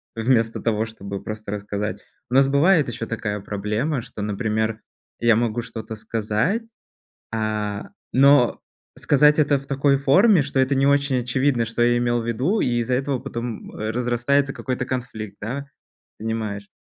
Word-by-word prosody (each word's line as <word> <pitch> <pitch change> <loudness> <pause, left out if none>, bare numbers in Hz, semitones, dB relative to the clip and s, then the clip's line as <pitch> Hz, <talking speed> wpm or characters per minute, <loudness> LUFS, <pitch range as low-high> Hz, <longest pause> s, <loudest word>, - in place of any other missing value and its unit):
вместо 115 0 +1
того, 110 -1 0
чтобы 100 -3 -7
просто 110 -1 -6
рассказать. 105 -1 -4 0.3
У 125 - -1
нас 135 0 +6
бывает 150 +3 +4
ещё 115 -1 -4
такая 105 -3 -3
проблема, 105 +8 -2
что, 115 - -8
например, 110 +1 -1 0.4
я 115 -1 +4
могу 115 0 0
что-то 110 -1 -7
сказать, 115 - -2 0.6
а, 105 -2 -2 0.2
но 135 -1 +5 0.3
сказать 150 +2 +4
это 145 -1 +3
в 140 - -9
такой 140 0 +2
форме, 180 +6 +5
что 140 -1 -2
это 130 +1 +2
не 135 +1 +3
очень 140 -2 +3
очевидно, 125 0 +1
что 115 +1 -3
я 120 0 +4
имел 120 0 +1
в 115 - -6
виду. 130 - 0
И - - +1
из-за 120 +2 -1
этого 135 +1 0
потом 115 -1 -6
разрастается 120 +5 0
какой-то 125 -1 -3
конфликт, 120 -6 -5
да, 130 +7 -4 0.5
понимаешь? 110 -2 -3
120 Hz, 155 wpm, -23 LUFS, 110-140 Hz, 0.6 s, нас